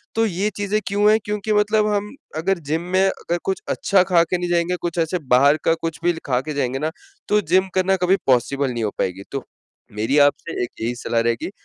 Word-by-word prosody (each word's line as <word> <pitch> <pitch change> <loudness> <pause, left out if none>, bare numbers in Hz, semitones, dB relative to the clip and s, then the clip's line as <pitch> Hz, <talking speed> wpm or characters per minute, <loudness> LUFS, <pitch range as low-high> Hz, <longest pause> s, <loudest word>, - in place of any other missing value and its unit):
तो 225 0 +3
ये 200 +1 -1
चीज़ें 205 +1 0
क्यों 205 +1 +3
है? 220 - +5
क्योंकि 210 0 -2
मतलब 210 +1 +2
हम 205 +5 -3 0.2
अगर 185 +2 0
जिम 160 - +1
में 190 - +4
अगर 175 -2 -1
कुछ 190 - -1
अच्छा 195 -2 +3
खा 175 -3 +3
के 180 +1 -1
नहीं 175 0 -3
जाएँगे, 175 +1 +1
कुछ 175 0 -3
ऐसे 165 +2 0 0.2
बाहर 140 +4 +5
का 165 - +4
कुछ 165 -4 -4
भी 175 0 +3
खा 125 -2 +1
के 155 +3 -5
जाएँगे 135 -2 -1
ना, 155 +2 -1 0.4
तो 210 0 +3
जिम 185 +3 +2
करना 190 +1 +3
कभी 185 +2 +4
पॉसिबल 135 +1 +2
नहीं 115 -1 -3
हो 105 - -2
पाएगी। 95 +1 -2
तो 135 -2 -4 0.5
मेरी 110 +7 0
आपसे 145 +2 +1
एक 120 - -3
यही 115 +2 -1
सलाह 115 -1 -1
रहेगी, 115 +7 -1
170 Hz, 220 wpm, -21 LUFS, 135-195 Hz, 0.5 s, है